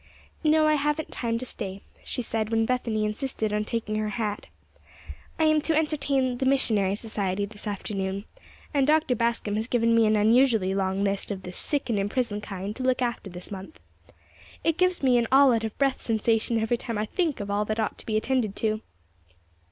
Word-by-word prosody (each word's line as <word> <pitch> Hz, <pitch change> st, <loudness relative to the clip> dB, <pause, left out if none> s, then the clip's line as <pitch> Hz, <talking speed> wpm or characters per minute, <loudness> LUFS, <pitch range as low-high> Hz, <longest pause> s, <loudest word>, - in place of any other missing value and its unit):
"No; 310 Hz, 0 st, +4 dB
I 305 Hz, -, +4 dB
haven't 295 Hz, +1 st, 0 dB
time 230 Hz, -2 st, -1 dB
to 250 Hz, -, -5 dB
stay," 195 Hz, -5 st, -2 dB, 0.2 s
she 250 Hz, -, -3 dB
said, 220 Hz, -1 st, -2 dB
when 225 Hz, 0 st, +2 dB
Bethany 225 Hz, -3 st, 0 dB
insisted 215 Hz, -1 st, -2 dB
on 210 Hz, 0 st, +1 dB
taking 220 Hz, -2 st, -2 dB
her 215 Hz, 0 st, -1 dB
hat. 210 Hz, -2 st, -3 dB, 0.9 s
"I 320 Hz, -, +1 dB
am 310 Hz, -1 st, +4 dB
to 320 Hz, +1 st, 0 dB
entertain 275 Hz, -5 st, 0 dB
the 265 Hz, -, 0 dB
Missionary 215 Hz, -8 st, +2 dB
Society 205 Hz, -3 st, -2 dB
this 210 Hz, +1 st, -7 dB
afternoon, 195 Hz, -1 st, -3 dB, 0.5 s
and 280 Hz, -2 st, +2 dB
Dr. 305 Hz, -3 st, +3 dB
Bascom 230 Hz, -3 st, 0 dB
has 220 Hz, +2 st, -2 dB
given 230 Hz, -2 st, +2 dB
me 230 Hz, -1 st, +5 dB
an 215 Hz, -, +3 dB
unusually 220 Hz, -2 st, +4 dB
long 195 Hz, 0 st, 0 dB
list 200 Hz, -1 st, -1 dB
of 195 Hz, -2 st, -5 dB
the 180 Hz, -, -6 dB
'sick 285 Hz, +9 st, -2 dB
and 225 Hz, -4 st, 0 dB
in 200 Hz, +1 st, -1 dB
prison' 225 Hz, -4 st, -1 dB
kind 200 Hz, 0 st, -5 dB
to -, -, -5 dB
look 255 Hz, 0 st, +2 dB
after 235 Hz, -4 st, -3 dB
this 180 Hz, +2 st, -9 dB
month. 195 Hz, +9 st, -8 dB, 0.8 s
It 330 Hz, 0 st, +1 dB
gives 365 Hz, -4 st, +2 dB
me 250 Hz, -2 st, +5 dB
an 235 Hz, -, 0 dB
'all 270 Hz, -1 st, +7 dB
out 225 Hz, -1 st, 0 dB
of 220 Hz, -1 st, -4 dB
breath' 275 Hz, -1 st, +1 dB
sensation 225 Hz, 0 st, +1 dB
every 225 Hz, +2 st, +1 dB
time 230 Hz, -2 st, -4 dB
I 210 Hz, -, 0 dB
think 330 Hz, -, -1 dB
of 200 Hz, -1 st, -4 dB
all 205 Hz, +1 st, +1 dB
that 215 Hz, +1 st, -2 dB
ought 220 Hz, -, -2 dB
to -, -, -9 dB
be 215 Hz, -1 st, +1 dB
attended 225 Hz, -3 st, 0 dB
to." 215 Hz, -1 st, -1 dB
225 Hz, 205 wpm, -26 LUFS, 210-260 Hz, 0.9 s, all